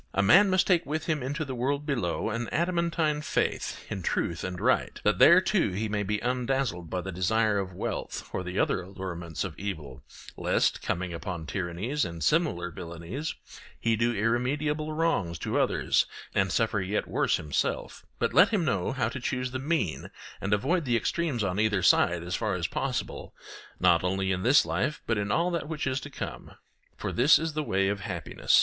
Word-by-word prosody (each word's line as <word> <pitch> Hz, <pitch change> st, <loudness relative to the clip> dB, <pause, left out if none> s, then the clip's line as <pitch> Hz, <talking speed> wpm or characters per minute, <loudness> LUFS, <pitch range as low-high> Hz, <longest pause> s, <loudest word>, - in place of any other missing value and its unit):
A 100 Hz, -, +3 dB
man 195 Hz, -, +7 dB
must 185 Hz, -1 st, +3 dB
take 175 Hz, -3 st, +3 dB
with 155 Hz, +2 st, -3 dB
him 155 Hz, -4 st, 0 dB
into 145 Hz, +5 st, -3 dB
the 135 Hz, -, -5 dB
world 140 Hz, +4 st, -1 dB
below 115 Hz, -, -1 dB
an 115 Hz, +1 st, -3 dB
adamantine 170 Hz, -3 st, 0 dB
faith -, -, -2 dB
in 95 Hz, -, -4 dB
truth 85 Hz, -1 st, -1 dB
and 90 Hz, -1 st, -4 dB
right, -, -, +1 dB
that -, -, +2 dB
there -, -, +9 dB
too -, -, +2 dB
he 110 Hz, +4 st, -1 dB
may 105 Hz, 0 st, -1 dB
be 105 Hz, +1 st, -1 dB
undazzled 125 Hz, -8 st, -1 dB
by 90 Hz, -, -2 dB
the 95 Hz, +2 st, -5 dB
desire 105 Hz, +4 st, +1 dB
of 95 Hz, -2 st, -5 dB
wealth -, -, -4 dB
or -, -, -1 dB
the 90 Hz, +1 st, -5 dB
other -, -, +2 dB
allurements 90 Hz, -3 st, -5 dB
of 95 Hz, -4 st, -4 dB
evil, 75 Hz, -11 st, -5 dB, 0.3 s
lest, -, -, +1 dB
coming 90 Hz, 0 st, -2 dB
upon 85 Hz, -1 st, -5 dB
tyrannies 95 Hz, -, -2 dB
and 85 Hz, -2 st, -4 dB
similar 150 Hz, -, +1 dB
villainies, 85 Hz, -, -6 dB, 0.4 s
he 115 Hz, -1 st, +2 dB
do 115 Hz, +2 st, +1 dB
irremediable 140 Hz, +8 st, 0 dB
wrongs 155 Hz, -, 0 dB
to -, -, -1 dB
others -, -, +2 dB, 0.3 s
and 95 Hz, 0 st, +1 dB
suffer 110 Hz, -3 st, +1 dB
yet 95 Hz, +3 st, -1 dB
worse -, -, +1 dB
himself; 75 Hz, -2 st, -2 dB
but -, -, 0 dB
let 190 Hz, +4 st, +7 dB
him 205 Hz, -7 st, +1 dB
know 100 Hz, -8 st, 0 dB
how 130 Hz, -5 st, 0 dB
to 120 Hz, +4 st, -5 dB
choose 125 Hz, +1 st, -2 dB
the 130 Hz, -, -3 dB
mean 140 Hz, -, -1 dB, 0.3 s
and 100 Hz, -, -2 dB
avoid 150 Hz, -, +2 dB
the 120 Hz, -4 st, +2 dB
extremes 145 Hz, -3 st, -1 dB
on 95 Hz, 0 st, -1 dB
either 105 Hz, -4 st, +2 dB
side, 85 Hz, -1 st, +4 dB
as 90 Hz, +1 st, -5 dB
far -, -, -1 dB
as -, -, -2 dB
possible, -, -, -3 dB, 0.4 s
not 90 Hz, -2 st, +4 dB
only 95 Hz, +1 st, 0 dB
in 90 Hz, -1 st, -1 dB
this 135 Hz, +7 st, +5 dB
life 150 Hz, -1 st, -1 dB
but 115 Hz, -3 st, 0 dB
in 100 Hz, 0 st, -2 dB
all 175 Hz, +2 st, +2 dB
that 165 Hz, -3 st, -3 dB
which 155 Hz, -2 st, -3 dB
is 130 Hz, -1 st, 0 dB
to 145 Hz, -, -8 dB
come. 140 Hz, -, -7 dB, 0.4 s
For -, -, -3 dB
this 135 Hz, +6 st, +6 dB
is 160 Hz, 0 st, -3 dB
the 155 Hz, -, -1 dB
way 95 Hz, -8 st, +1 dB
of 100 Hz, 0 st, -1 dB
happiness. 90 Hz, -6 st, +1 dB
110 Hz, 195 wpm, -28 LUFS, 90-150 Hz, 0.4 s, there